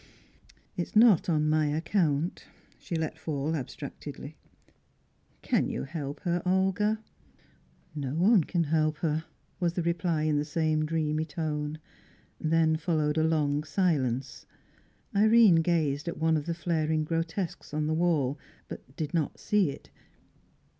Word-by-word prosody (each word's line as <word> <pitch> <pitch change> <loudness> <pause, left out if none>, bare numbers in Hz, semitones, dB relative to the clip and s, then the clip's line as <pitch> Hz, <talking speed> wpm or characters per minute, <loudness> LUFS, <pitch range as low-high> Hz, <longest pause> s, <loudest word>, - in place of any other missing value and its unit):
"It - - -1
is 170 - -7
not 215 -6 +6
on 155 -2 +2
my 155 0 +2
account," 160 0 0 0.3
she 170 - -5
let 160 -1 -3
fall, 155 0 -2
abstractedly. 135 -5 -7 1.1
"Can - - +1
you - - -3
help 145 -1 -6
her, 175 -1 0
Olga?" 190 +4 +1 0.9
"No 140 -2 -4
one 190 +2 +5
can 175 -2 0
help 155 0 +1
her," 160 +1 -1 0.3
was 175 -2 0
the 175 - -2
reply 170 -2 0
in 155 -1 +2
the - - 0
same 155 0 0
dreamy 155 -1 0
tone. 155 -2 -3 0.6
Then 160 0 +2
followed 155 -2 0
a - - +3
long 150 -2 +1
silence. 140 -8 -1 0.7
Irene 215 -3 +6
gazed 155 -3 0
at 170 - -3
one 160 0 +2
of 150 0 -2
the 170 - -1
flaring 160 -2 0
grotesques 165 +3 -3
on 150 0 -1
the 155 - 0
wall, 155 -5 +1 0.3
but 130 - -10
did 155 +1 -4
not 160 -4 -1
see 205 -6 +2
it. 140 - -10
160 Hz, 140 wpm, -28 LUFS, 150-170 Hz, 1.1 s, not